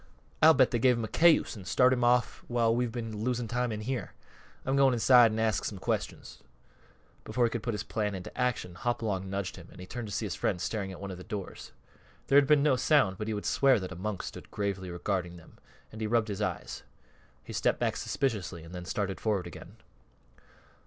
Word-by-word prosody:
I'll 160 Hz, 0 st, +8 dB
bet 130 Hz, -3 st, +4 dB
they 120 Hz, -, +1 dB
gave 125 Hz, 0 st, +4 dB
him 115 Hz, -, -2 dB
a -, -, -2 dB
cayuse 165 Hz, -1 st, +4 dB
an' 100 Hz, -4 st, -10 dB
started 125 Hz, +5 st, +4 dB
him 120 Hz, -, -1 dB
off 125 Hz, +1 st, +2 dB
while 115 Hz, -1 st, +2 dB
we've 120 Hz, -1 st, 0 dB
been 115 Hz, -3 st, -5 dB
losing 120 Hz, -1 st, -1 dB
time 125 Hz, +1 st, -1 dB
in 105 Hz, 0 st, -4 dB
here. 120 Hz, -3 st, -4 dB, 0.5 s
I'm 135 Hz, -, +1 dB
going 135 Hz, -2 st, +4 dB
inside 120 Hz, -1 st, +6 dB
an' 110 Hz, -, -3 dB
ask 110 Hz, -7 st, +1 dB
some -, -, -4 dB
questions." -, -, -4 dB, 0.8 s
Before 125 Hz, -, -1 dB
he 115 Hz, -, 0 dB
could 115 Hz, -, -3 dB
put 115 Hz, 0 st, -2 dB
his 105 Hz, -, -4 dB
plan 105 Hz, -3 st, -2 dB
into 90 Hz, -, -8 dB
execution, 125 Hz, -8 st, -2 dB
Hopalong 105 Hz, -5 st, -2 dB
nudged 100 Hz, -1 st, -3 dB
him -, -, -11 dB
and -, -, -15 dB
he 90 Hz, -, -7 dB
turned 120 Hz, +3 st, -6 dB
to -, -, -8 dB
see 110 Hz, -, -2 dB
his 95 Hz, -, -3 dB
friend 90 Hz, +4 st, -1 dB
staring 100 Hz, +1 st, -3 dB
at 95 Hz, -, -9 dB
one 100 Hz, -1 st, -6 dB
of 90 Hz, -, -8 dB
the -, -, -9 dB
doors. 105 Hz, -4 st, -7 dB, 0.6 s
There 140 Hz, -, +6 dB
had 140 Hz, -, +2 dB
been 150 Hz, -1 st, +5 dB
no 145 Hz, -4 st, +3 dB
sound, 125 Hz, -, +3 dB
but 105 Hz, -, -3 dB
he 110 Hz, -, -1 dB
would 105 Hz, -, -5 dB
swear 135 Hz, -4 st, +4 dB
that 95 Hz, -1 st, -6 dB
a -, -, -6 dB
monk 95 Hz, +2 st, -4 dB
stood -, -, -8 dB
gravely 100 Hz, -2 st, -3 dB
regarding 90 Hz, 0 st, -3 dB
them, 80 Hz, -, -17 dB, 0.3 s
and 110 Hz, -, -9 dB
he 110 Hz, -, 0 dB
rubbed 115 Hz, 0 st, +1 dB
his 100 Hz, -, -4 dB
eyes. -, -, -3 dB, 0.6 s
He -, -, -9 dB
stepped -, -, +1 dB
back -, -, 0 dB
suspiciously 105 Hz, -, -2 dB
and 85 Hz, +2 st, -12 dB
then 90 Hz, -1 st, -6 dB
started 95 Hz, +1 st, -3 dB
forward 105 Hz, -4 st, 0 dB
again. 85 Hz, -, -10 dB
110 Hz, 225 wpm, -29 LUFS, 95-125 Hz, 0.8 s, I'll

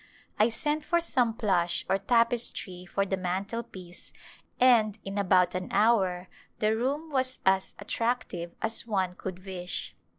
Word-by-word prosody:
I 215 Hz, +2 st, +5 dB
sent 295 Hz, +6 st, -2 dB
for 340 Hz, -, +2 dB
some 250 Hz, -9 st, +1 dB
plush 175 Hz, -6 st, +1 dB
or 195 Hz, -, +1 dB
tapestry 230 Hz, -5 st, 0 dB
for 200 Hz, +2 st, 0 dB
the 190 Hz, -1 st, -1 dB
mantelpiece 185 Hz, 0 st, -5 dB, 0.5 s
and 225 Hz, -4 st, +4 dB
m 195 Hz, +1 st, -3 dB
about 185 Hz, -2 st, +3 dB
an 185 Hz, 0 st, -3 dB
hour 195 Hz, -4 st, +2 dB, 0.3 s
the 215 Hz, +1 st, +1 dB
room 285 Hz, +7 st, -2 dB
was 260 Hz, -2 st, -1 dB
as 190 Hz, 0 st, +2 dB
attractive 205 Hz, -5 st, -3 dB
as 225 Hz, +1 st, +3 dB
one 190 Hz, -4 st, 0 dB
could 185 Hz, 0 st, -7 dB
wish. 180 Hz, -2 st, -4 dB
200 Hz, 140 wpm, -28 LUFS, 185-235 Hz, 0.5 s, I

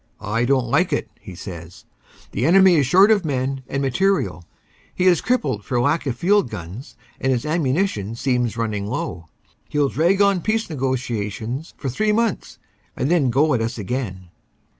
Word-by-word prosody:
"I 115 Hz, +4 st, -1 dB
don 130 Hz, 0 st, +2 dB
t 120 Hz, -, -7 dB
like 175 Hz, 0 st, +2 dB
it," 115 Hz, -7 st, -2 dB
he 95 Hz, -, -11 dB
says. 85 Hz, -1 st, -10 dB, 0.5 s
"The 110 Hz, -, -2 dB
enemy 190 Hz, +1 st, +6 dB
is 140 Hz, -4 st, +2 dB
short 190 Hz, +9 st, +6 dB
of 205 Hz, -3 st, +3 dB
men 135 Hz, -2 st, -2 dB
and 135 Hz, 0 st, -2 dB
material. 135 Hz, -, 0 dB, 0.5 s
He 180 Hz, -, 0 dB
is 180 Hz, -4 st, +4 dB
crippled 145 Hz, -, 0 dB
for 125 Hz, +2 st, -1 dB
lack 145 Hz, +5 st, +1 dB
of 125 Hz, -, -1 dB
field 200 Hz, -1 st, +2 dB
guns 95 Hz, -, -8 dB, 0.2 s
and 135 Hz, -, 0 dB
his 125 Hz, 0 st, -1 dB
ammu 150 Hz, -3 st, 0 dB
nition 115 Hz, -, -1 dB
seems 125 Hz, -3 st, 0 dB
running 105 Hz, -3 st, -2 dB
low. 85 Hz, -5 st, -4 dB, 0.4 s
He -, -, -4 dB
ll 140 Hz, -2 st, +3 dB
drag 175 Hz, +8 st, +2 dB
on 200 Hz, -3 st, +3 dB
peace 220 Hz, -2 st, -1 dB
negotiations 125 Hz, -1 st, -3 dB
for 140 Hz, -, -5 dB
three 210 Hz, -, 0 dB
months 225 Hz, -1 st, -1 dB, 0.4 s
and 135 Hz, -, 0 dB
then 155 Hz, -7 st, +3 dB
go 145 Hz, +5 st, +3 dB
at 120 Hz, -, +1 dB
us 115 Hz, +2 st, -3 dB
again." 95 Hz, -4 st, -4 dB
130 Hz, 185 wpm, -21 LUFS, 115-175 Hz, 0.5 s, enemy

